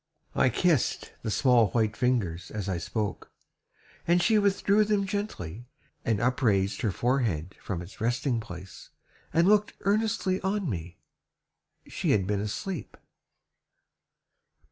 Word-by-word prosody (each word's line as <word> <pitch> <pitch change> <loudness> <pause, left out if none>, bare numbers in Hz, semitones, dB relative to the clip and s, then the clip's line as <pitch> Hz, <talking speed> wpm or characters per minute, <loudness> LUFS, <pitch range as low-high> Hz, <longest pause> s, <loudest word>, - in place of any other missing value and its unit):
I 130 - +3
kissed 165 -2 +1
the - - -3
small 120 0 +4
white 110 -3 +1
fingers 100 -10 0
as 105 -2 -4
I 90 -3 -1
spoke, 105 +3 -3 0.8
And 175 +1 +4
she 215 +4 +4
withdrew 200 +1 +3
them 205 -1 +1
gently, 125 - -4 0.4
and 110 -3 +1
upraised 110 -6 +1
Her 110 - +1
forehead 105 - 0
from 90 -3 -4
its 90 - -13
resting 120 +1 0
place, 90 -4 -10 0.4
and 165 +3 +3
looked 210 0 +4
Earnestly 200 -2 +1
on 195 0 -1
me 90 - -5 0.9
She - - -3
had 95 -3 +2
been 100 +1 0
asleep! 145 - -5
120 Hz, 125 wpm, -28 LUFS, -, 0.9 s, small